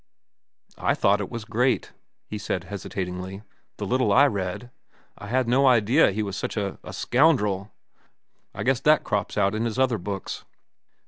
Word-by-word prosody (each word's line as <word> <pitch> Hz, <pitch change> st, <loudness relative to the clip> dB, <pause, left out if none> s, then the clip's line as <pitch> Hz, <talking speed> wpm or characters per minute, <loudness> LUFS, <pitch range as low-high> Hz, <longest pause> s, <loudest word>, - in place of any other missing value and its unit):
"I -, -, +1 dB
thought 100 Hz, +1 st, +2 dB
it 100 Hz, -, -4 dB
was 115 Hz, -3 st, -6 dB
great," 120 Hz, +3 st, 0 dB, 0.4 s
he 105 Hz, -, -5 dB
said 95 Hz, -3 st, -3 dB
hesitatingly, 95 Hz, 0 st, -5 dB, 0.3 s
"the -, -, -4 dB
little 130 Hz, +1 st, +1 dB
I 140 Hz, +3 st, +6 dB
read. 100 Hz, 0 st, -3 dB, 0.4 s
I 100 Hz, -, -10 dB
had 125 Hz, +2 st, +1 dB
no 135 Hz, +3 st, +4 dB
idea 120 Hz, +4 st, +5 dB
he 105 Hz, +3 st, -2 dB
was 100 Hz, -2 st, -4 dB
such -, -, -4 dB
a—a 100 Hz, -2 st, -4 dB
scoundrel. 105 Hz, -8 st, +2 dB, 0.8 s
I -, -, -5 dB
guess 130 Hz, -1 st, +2 dB
that 150 Hz, +2 st, +4 dB
crops 105 Hz, -1 st, -2 dB
out 100 Hz, +1 st, +2 dB
in 110 Hz, +2 st, -1 dB
his 115 Hz, 0 st, -3 dB
other 130 Hz, -4 st, +2 dB
books." 95 Hz, +1 st, -5 dB
110 Hz, 165 wpm, -25 LUFS, 100-125 Hz, 0.8 s, I